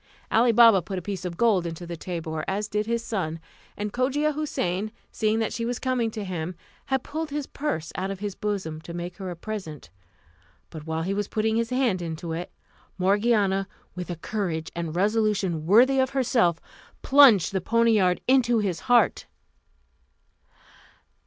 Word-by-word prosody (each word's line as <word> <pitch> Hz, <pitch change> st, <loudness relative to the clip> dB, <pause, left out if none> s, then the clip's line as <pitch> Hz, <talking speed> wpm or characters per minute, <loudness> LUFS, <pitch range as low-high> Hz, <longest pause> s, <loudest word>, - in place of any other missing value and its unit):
Ali 235 Hz, +2 st, +4 dB
Baba 230 Hz, -4 st, +7 dB
put 190 Hz, +3 st, -5 dB
a -, -, -3 dB
piece 195 Hz, -1 st, -5 dB
of 170 Hz, -2 st, -5 dB
gold 200 Hz, -7 st, +3 dB
into 165 Hz, +1 st, -6 dB
the 170 Hz, 0 st, -6 dB
tabour, 165 Hz, -2 st, -4 dB
as 205 Hz, +2 st, -1 dB
did 210 Hz, 0 st, -1 dB
also -, -, -8 dB
his 235 Hz, 0 st, -1 dB
son; 180 Hz, -9 st, -3 dB, 0.4 s
and 205 Hz, 0 st, -4 dB
Cogia 285 Hz, +5 st, +1 dB
Houssain 215 Hz, -9 st, -2 dB, 0.2 s
seeing 215 Hz, 0 st, 0 dB
that 225 Hz, -1 st, -1 dB
she 230 Hz, -, -3 dB
was 240 Hz, +1 st, -2 dB
coming 255 Hz, -3 st, 0 dB
to 215 Hz, -1 st, -5 dB
him, 180 Hz, -2 st, -4 dB, 0.3 s
had 265 Hz, -2 st, 0 dB
pulled 315 Hz, +1 st, -4 dB
his 290 Hz, 0 st, -3 dB
purse 170 Hz, -, -3 dB
out 190 Hz, +1 st, -3 dB
of 195 Hz, -, -4 dB
his 205 Hz, -1 st, -4 dB
bosom 185 Hz, -7 st, -3 dB
to 170 Hz, +1 st, -8 dB
make 175 Hz, 0 st, -6 dB
her 190 Hz, -2 st, -5 dB
a 175 Hz, -, -5 dB
present; 165 Hz, -, -7 dB, 0.8 s
but 155 Hz, -1 st, -9 dB
while 160 Hz, 0 st, -2 dB
he 190 Hz, +3 st, -1 dB
was 205 Hz, 0 st, -2 dB
putting 220 Hz, 0 st, 0 dB
his 230 Hz, 0 st, 0 dB
hand 250 Hz, -8 st, +1 dB
into 165 Hz, 0 st, -5 dB
it, 170 Hz, +2 st, -5 dB, 0.5 s
Morgiana, 195 Hz, 0 st, +2 dB, 0.3 s
with 180 Hz, 0 st, -6 dB
a 175 Hz, -, -3 dB
courage 165 Hz, -2 st, -3 dB
and 170 Hz, -1 st, -4 dB
resolution 200 Hz, -5 st, +1 dB
worthy 250 Hz, +8 st, +5 dB
of 260 Hz, -1 st, +2 dB
herself, 235 Hz, -11 st, +2 dB, 0.4 s
plunged 245 Hz, -, +6 dB
the 190 Hz, -, 0 dB
poniard 220 Hz, -4 st, +3 dB
into 245 Hz, -2 st, +4 dB
his 195 Hz, -6 st, -1 dB
heart. 240 Hz, -6 st, +3 dB
205 Hz, 175 wpm, -25 LUFS, 175-230 Hz, 0.8 s, Baba